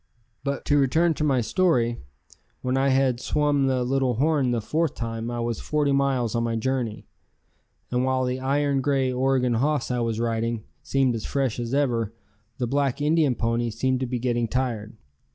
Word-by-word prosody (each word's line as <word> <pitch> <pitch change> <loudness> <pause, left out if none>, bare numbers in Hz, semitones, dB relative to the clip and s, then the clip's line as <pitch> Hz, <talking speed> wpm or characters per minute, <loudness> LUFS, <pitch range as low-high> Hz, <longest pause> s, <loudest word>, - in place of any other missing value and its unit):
But 140 0 -3
to 145 0 +3
return 160 +5 +3
to 150 - -3
my 135 -4 +2
story. 120 - +1 0.6
When 125 +1 0
I 135 +1 +2
had 130 -2 +2
swum 145 0 +1
the 130 -1 +1
Little 130 -1 +1
Horn 145 0 +2
the 120 -1 +1
fourth 160 +9 -1
time 115 0 -4
I 120 0 -3
was 115 -2 -2
forty 150 -2 0
miles 135 -4 +1
on 115 - 0
my 115 -1 -1
journey, 120 -2 -2 0.9
and 125 0 +1
while 130 0 +1
the 125 +1 -2
iron 140 +1 +1
grey 135 -2 +1
Oregon 130 -1 +1
hoss 140 +3 0
I 125 - 0
was 115 -2 -1
riding 115 -1 -1 0.2
seemed 135 -2 +1
as 110 -2 -4
fresh 135 -4 -1
as 120 +2 -2
ever, 115 -6 0 0.4
the 125 - -1
black 140 +1 0
Indian 150 -3 +2
ponies 115 -1 -1
seemed 130 +1 +1
to 130 - -2
be 125 +1 -2
getting 120 -1 0
tired. 115 -3 -2
130 Hz, 185 wpm, -25 LUFS, 120-140 Hz, 0.9 s, to